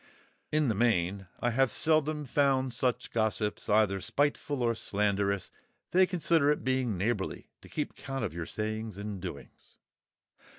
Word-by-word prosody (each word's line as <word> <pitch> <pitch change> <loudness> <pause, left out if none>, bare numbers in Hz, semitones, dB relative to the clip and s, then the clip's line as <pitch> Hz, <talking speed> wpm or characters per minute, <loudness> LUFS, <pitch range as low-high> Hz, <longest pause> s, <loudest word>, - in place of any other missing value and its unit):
In 155 -1 +2
the 115 - +2
main, 100 -4 +1
I 120 - +2
have 130 0 +2
seldom 155 0 +1
found 135 -2 +2
such 125 0 0
gossips 110 -2 -1
either 105 -2 +3
spiteful 145 - 0
or 115 -1 +3
slanderous. 100 -2 0 0.4
They 185 +1 +5
consider 165 -4 +2
it 150 - +1
being 130 -5 0
neighbourly 100 +1 -2
to - - -14
keep - - -3
count 135 -4 -4
of 95 - -4
your 85 -1 -5
sayings 110 0 -4
and 100 -2 -5
doings. 85 -6 -9
115 Hz, 145 wpm, -30 LUFS, 100-140 Hz, 0.4 s, They